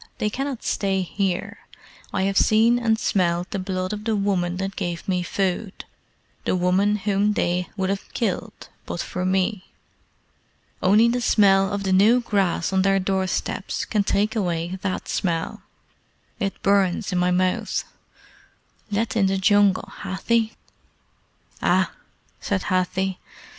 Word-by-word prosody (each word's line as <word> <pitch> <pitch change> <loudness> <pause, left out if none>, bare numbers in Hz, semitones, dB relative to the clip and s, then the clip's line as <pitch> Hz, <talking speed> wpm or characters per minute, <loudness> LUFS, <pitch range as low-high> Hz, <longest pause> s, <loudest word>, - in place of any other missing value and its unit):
They 210 - -1
cannot 270 0 -4
stay 195 -2 0
here. 190 0 -2 0.5
I 190 - 0
have 195 0 0
seen 225 +4 +4
and 225 -2 +2
smelled 175 -4 0
the 195 - -2
blood 185 0 -3
of 210 0 -5
the 225 -1 +1
woman 185 -3 0
that 195 +1 -3
gave 175 -3 -4
me 180 -2 +1
food 190 +2 -2 0.6
the - - 0
woman 185 +3 +2
whom 205 0 +1
they 180 -2 0
would 190 0 0
have 200 - -5
killed 225 0 -3 0.2
but - - -4
for 180 +1 -3
me. 190 +1 0 1.1
Only 210 +5 +5
the 245 +1 0
smell 195 -3 +4
of 200 -1 -2
the 190 -1 +1
new 215 +6 +5
grass 195 -6 0
on 190 - +3
their 195 +1 +3
door 190 0 0
steps - - -3
can 210 -2 +1
take 210 +3 0
away 175 -2 -2
that 190 -2 -3
smell. 165 -3 -2 0.8
It 195 -3 -2
burns 195 -2 +2
in 180 - 0
my 180 0 +2
mouth. 185 0 0 1.1
Let 215 +3 -1
in 200 -4 +3
the 195 0 +1
Jungle, 200 0 +3
Hathi!" 220 +3 0 1.1
"Ah!" - - +2 0.5
said 195 -2 -2
Hathi. 185 0 -1
195 Hz, 145 wpm, -23 LUFS, 185-210 Hz, 1.1 s, Only